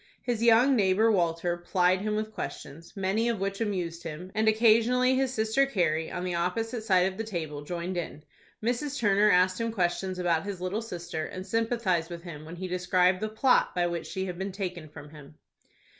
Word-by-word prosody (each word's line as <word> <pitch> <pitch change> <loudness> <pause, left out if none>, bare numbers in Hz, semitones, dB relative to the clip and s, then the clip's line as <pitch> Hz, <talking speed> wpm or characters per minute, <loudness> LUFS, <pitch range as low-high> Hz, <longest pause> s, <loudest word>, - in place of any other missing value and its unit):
His 240 -3 -2
young 235 +4 +5
neighbor, 210 +1 +3
Walter, 175 -2 +1
plied 180 +1 +1
him 210 +1 -1
with 215 0 -3
questions, 165 0 -8
many 195 +5 0
of 230 -4 -1
which 195 +2 -3
amused 180 -6 -2
him, 170 +4 -7
and 220 +1 +1
occasionally 230 +3 +4
his 260 0 +1
sister 220 +3 +1
Carrie, 165 - 0
on 180 - -4
the 180 -1 -2
opposite 220 +7 -2
side 185 -4 +3
of 190 +1 -3
the - - -1
table, 160 -9 -5
joined 175 +3 -4
in. 160 -3 -5 0.4
Mrs. 255 +5 -1
Turner 205 -1 +3
asked 185 +3 +3
him 230 0 -1
questions 185 -1 -1
about 170 -3 +1
his 200 -2 -5
little 185 +5 -2
sister, 175 -7 -5
and 185 0 -7
sympathized 210 -6 0
with 170 -1 -8
him 155 -4 -9
when 165 +2 -8
he 185 +1 -5
described 180 0 +2
the 215 - -1
plot 220 +1 +2
by 175 -1 +2
which 170 -1 -3
she 190 0 -3
had 180 -1 -6
been 195 +1 -3
taken 180 -5 -5
from 145 0 -12
him. 150 -1 -13
185 Hz, 200 wpm, -28 LUFS, 175-220 Hz, 0.4 s, young